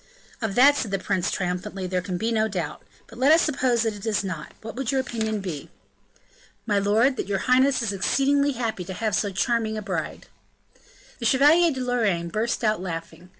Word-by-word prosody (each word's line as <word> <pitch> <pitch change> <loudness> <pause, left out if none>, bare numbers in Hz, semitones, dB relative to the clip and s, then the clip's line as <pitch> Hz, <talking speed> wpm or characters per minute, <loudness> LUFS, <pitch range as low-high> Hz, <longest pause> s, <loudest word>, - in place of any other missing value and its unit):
"Of 220 -4 -2
that," 280 +3 +6
said 225 - -2
the 195 - 0
prince 190 -1 -1
triumphantly, 180 +1 -3
"there 180 0 -1
can 180 0 -4
be 225 +5 -1
no 220 -1 +2
doubt; 175 -7 -4 0.2
but 230 - -14
let 270 +3 +5
us 325 +1 +6
suppose 255 -6 +1
that 225 -1 0
it 205 -1 -10
is 210 -2 +1
not, 185 -6 -6
what 220 0 -7
would 265 0 -2
your 270 - +1
opinion 220 -5 -2
be?" 170 -7 -6 1.0
"My 205 -3 +2
lord, 225 +7 +2
that - - -3
your 200 -1 0
highness 260 0 +3
is 210 -3 -1
exceedingly 280 +8 +2
happy 225 -6 -3
to 190 - -6
have 220 +1 -2
so 205 - +1
charming 220 +2 0
a - - -3
bride." - - -4 0.9
The 235 - -4
Chevalier 305 +7 +5
de 260 -2 -4
Lorraine 215 -9 0
burst 225 +6 -2
out 215 -4 +1
laughing. 165 -1 -7
220 Hz, 200 wpm, -24 LUFS, 190-255 Hz, 1.0 s, that